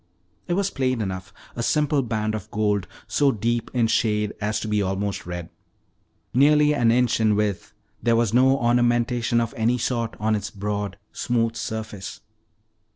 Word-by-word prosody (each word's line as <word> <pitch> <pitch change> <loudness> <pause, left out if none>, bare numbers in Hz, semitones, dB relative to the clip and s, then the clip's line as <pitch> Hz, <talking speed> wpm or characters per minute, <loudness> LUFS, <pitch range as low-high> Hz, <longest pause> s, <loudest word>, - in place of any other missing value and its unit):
It 175 - 0
was 195 +1 0
plain 130 -2 0
enough, 95 -2 -4 0.2
a 120 - -3
simple 150 +3 +2
band 110 -3 -2
of 110 -1 -5
gold 105 -4 0 0.2
so 140 -2 +3
deep 115 +1 -1
in 120 -3 +2
shade 105 -2 +1
as 105 +1 0
to - - -4
be 105 -1 +1
almost 95 0 -2
red. 90 -1 -6 0.8
Nearly 150 +3 +5
an 120 -6 +3
inch 120 +1 +3
in 110 -2 +3
width, 105 -2 -1 0.3
there 115 -1 +3
was 115 -2 +1
no 130 +2 +5
ornamentation 120 -1 +2
of 115 -1 -2
any 115 +2 +1
sort 115 -1 -2
on 110 0 +1
its 105 0 -3
broad, 100 0 -3
smooth 115 -2 0
surface. 110 -4 -5
115 Hz, 160 wpm, -24 LUFS, 105-120 Hz, 0.8 s, Nearly